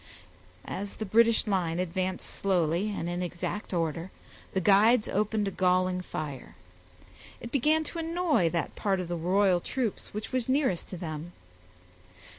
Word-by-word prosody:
As 200 +1 -5
the 220 - -4
British 230 +2 +4
line 180 -6 0
advanced 185 +1 -2
slowly 180 0 0
and 200 -5 -3
in 175 +1 -2
exact 180 +3 -4
order, 165 0 -1 0.4
the 190 - 0
guides 210 +5 +5
opened 210 +1 0
a - - -1
galling 185 0 +2
fire. 150 -6 -6 0.8
It 235 - -8
began 305 +4 +3
to 335 +2 -5
annoy 325 - +1
that 170 -1 -2
part 195 -3 0
of 180 - -3
the 175 - -1
royal 180 +2 +3
troops 235 +3 -3
which 210 +1 -5
was 255 -1 -1
nearest 260 - +1
to 185 - -7
them. 165 0 -6
190 Hz, 150 wpm, -29 LUFS, 175-220 Hz, 0.8 s, guides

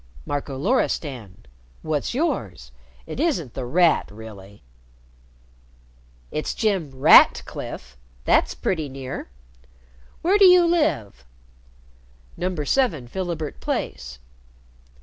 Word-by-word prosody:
"Marco 140 -1 -4
Loristan. 135 - -2 0.4
What's 155 +7 -2
yours? 110 - -2 0.3
It - - -7
isn't 230 - -1
The 130 -2 -5
Rat 170 +5 +3
really." 100 -3 -12 1.7
"It's 155 - -3
Jem 195 - 0
_Rat_cliffe. 65 - +3 0.3
That's - - +2
pretty 160 -6 -2
near. 130 - -7 0.9
Where 385 +5 +3
do 395 - +8
you 360 -1 +7
live?" 295 - 0 1.1
"No. 185 +1 -2
7 160 - 0
Philibert 170 -3 -4
Place." 65 -2 -4
145 Hz, 90 wpm, -23 LUFS, -, 1.7 s, do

